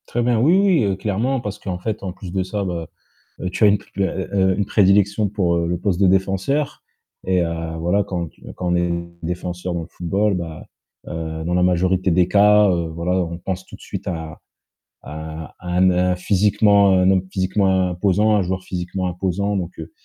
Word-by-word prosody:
Très 120 - -1
bien, 120 -2 +2
oui, 160 +10 +4
oui, 190 - +3
heu, 100 -2 +1
clairement, 110 +7 -1
parce 105 -3 -6
qu'en 95 -4 -4
fait, 105 +3 -4
en 95 - -3
plus 90 -1 -9
de 95 0 0
ça, 100 +2 -3
bah, 85 -4 -4 0.5
heu, 90 - -3
tu 95 - +1
as - - +8
une, 100 0 +3 0.2
heu, - - +2
heu, 95 0 -3 0.2
heu, - - -2
une 100 - 0
prédilection 100 +1 +3
pour 95 -4 0
le 85 +1 -1
poste 95 0 -1
de 100 - +5
défenseur 95 +10 0 0.4
et 90 -1 +2
heu, 85 -1 -3
voilà, 90 +5 +1
quand 90 -3 -3
tu - - -27
quand 90 -1 -2
on - - +3
est 85 0 +1 0.3
défenseur 90 +1 -4
dans 85 - -2
le - - -8
football, 100 +5 0
bah, 85 -3 -6 0.4
heu, 80 -1 -5
dans 85 +2 -1
la 90 - +2
majorité 90 +1 +2
des 90 +1 +3
cas, 105 +1 +5
heu, 85 -2 0
voilà, 85 +2 -3
on 85 0 -6
pense 95 +1 -4
tout - - -11
de - - -27
suite - - -7
à 80 -3 -5 0.6
à 80 +1 -8
à 90 - -11
un 95 0 +5
n 90 0 +2
physiquement, 100 +1 +3
un 90 0 +4
homme 95 -1 +2
physiquement 95 -1 +1
imposant. 100 +4 +2
Un 105 - +3
joueur 95 +1 -3
physiquement 90 +1 -3
imposant 95 +3 -1
donc 90 -3 -2
heu, 80 - -8
95 Hz, 210 wpm, -21 LUFS, 85-100 Hz, 0.6 s, as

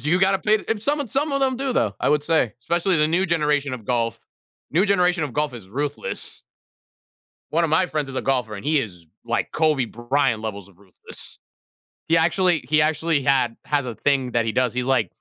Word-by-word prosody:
do 150 - -2
you 180 - +4
gotta 195 0 +3
pay 210 +3 +2
if 225 -2 -1
some 290 +5 +1
and 275 - -4
some 280 +3 0
of 275 - 0
them 260 -1 +1
do 270 0 -2
though, 105 - +1
I - - +1
would 150 -1 +2
say, 155 -8 +2
especially 170 +5 +1
the 150 0 +3
new 180 +4 +1
generation 150 -4 +1
of 115 -4 -9
golf. 115 -3 -1 0.5
New 185 +7 +3
generation 180 -3 +2
of 140 - -6
golf 150 -2 0
is 110 -6 -10
ruthless. 145 +6 -3 1.1
One 170 +2 +2
of 160 - -1
my 180 +4 +4
friends 150 -5 -3
is 135 - -6
a - - -1
golfer, 125 -5 0
and 100 - -8
he 150 0 +3
is 90 -8 -8 0.2
like 120 0 -1
Kobe 155 -5 +2
Bryant 120 +1 0
levels 100 -3 -6
of 90 - -25
ruthless. 100 -2 -7 0.7
He 165 - +4
actually 175 +1 +3
he 150 +1 +4
actually 155 -1 +1
had 130 -3 +2
has 145 -3 0
a 120 - -4
thing 135 -1 0
that 115 -1 +2
he 110 - -1
does. 125 -1 +1
He's 125 0 -1
like, 130 -8 +1
145 Hz, 220 wpm, -23 LUFS, 120-170 Hz, 1.1 s, you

